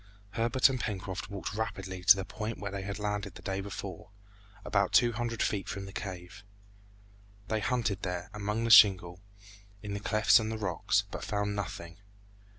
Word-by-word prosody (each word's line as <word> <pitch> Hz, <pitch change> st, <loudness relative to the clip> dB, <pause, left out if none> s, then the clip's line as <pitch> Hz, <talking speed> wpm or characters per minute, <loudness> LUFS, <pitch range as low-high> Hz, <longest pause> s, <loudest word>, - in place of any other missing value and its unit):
Herbert 115 Hz, +4 st, +3 dB
and 130 Hz, -2 st, -2 dB
Pencroft 100 Hz, -2 st, -4 dB
walked 100 Hz, 0 st, -5 dB
rapidly 95 Hz, -4 st, -4 dB
to 110 Hz, -, +9 dB
the 95 Hz, -1 st, -4 dB
point 110 Hz, 0 st, -5 dB
where 100 Hz, -1 st, -5 dB
they 100 Hz, 0 st, -4 dB
had 100 Hz, +1 st, -5 dB
landed 105 Hz, -2 st, -3 dB
the -, -, -12 dB
day 95 Hz, 0 st, -2 dB
before, 95 Hz, -2 st, -7 dB, 0.6 s
about 100 Hz, -2 st, +1 dB
two 120 Hz, -1 st, +5 dB
hundred 115 Hz, 0 st, -2 dB
feet 100 Hz, -2 st, -2 dB
from 100 Hz, -1 st, -5 dB
the 95 Hz, -, -10 dB
cave. 95 Hz, 0 st, -7 dB, 1.1 s
They 110 Hz, -, 0 dB
hunted 110 Hz, -4 st, -1 dB
there, 90 Hz, -1 st, -4 dB
among 105 Hz, +2 st, -2 dB
the 115 Hz, -, +1 dB
shingle, 90 Hz, -5 st, +7 dB, 0.6 s
in 105 Hz, -1 st, -5 dB
the 100 Hz, -, -3 dB
clefts 110 Hz, +1 st, +4 dB
of 110 Hz, -1 st, -3 dB
the 110 Hz, -, -3 dB
rocks, 95 Hz, -6 st, 0 dB
but -, -, -6 dB
found 105 Hz, 0 st, -2 dB
nothing. 90 Hz, -4 st, -6 dB
100 Hz, 175 wpm, -30 LUFS, 95-110 Hz, 1.1 s, to